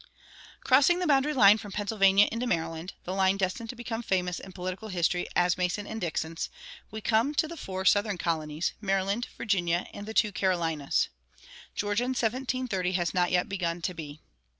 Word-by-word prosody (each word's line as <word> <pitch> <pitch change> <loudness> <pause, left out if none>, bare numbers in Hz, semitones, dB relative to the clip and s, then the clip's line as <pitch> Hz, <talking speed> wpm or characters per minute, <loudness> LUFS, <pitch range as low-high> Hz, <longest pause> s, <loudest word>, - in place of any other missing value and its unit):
Crossing 280 +7 +5
the 360 - -1
boundary 285 -1 +3
line 210 -3 +7
from 205 -1 -9
Pennsylvania 200 -1 +4
into 235 +2 -2
Maryland 165 -1 -2
the 185 - -4
line 190 0 +2
destined 195 +4 -2
to 250 - -5
become 235 -1 -4
famous 180 -5 -1
in 190 - -10
political 185 +3 -5
history 180 -2 0
as 175 0 +2
Mason 180 +3 -1
and 220 +1 -6
Dixon's 165 -1 -3 0.4
we 220 - -7
come 235 +7 +2
to 315 - +2
the 335 - -7
four 190 - -5
Southern 205 0 +3
colonies, 160 -1 -1
Maryland, 195 +3 0
Virginia, 175 -5 0
and 205 +1 -8
the 220 - -6
two 210 - +3
Carolinas. 165 -6 0 0.7
Georgia 205 +4 0
in 260 +1 -2
1730 240 -6 -1
has 175 -2 0
not 180 -1 +2
yet 180 +3 +1
begun 175 -4 -2
to 180 - -1
be. 155 -3 -8
195 Hz, 175 wpm, -28 LUFS, 180-220 Hz, 0.7 s, line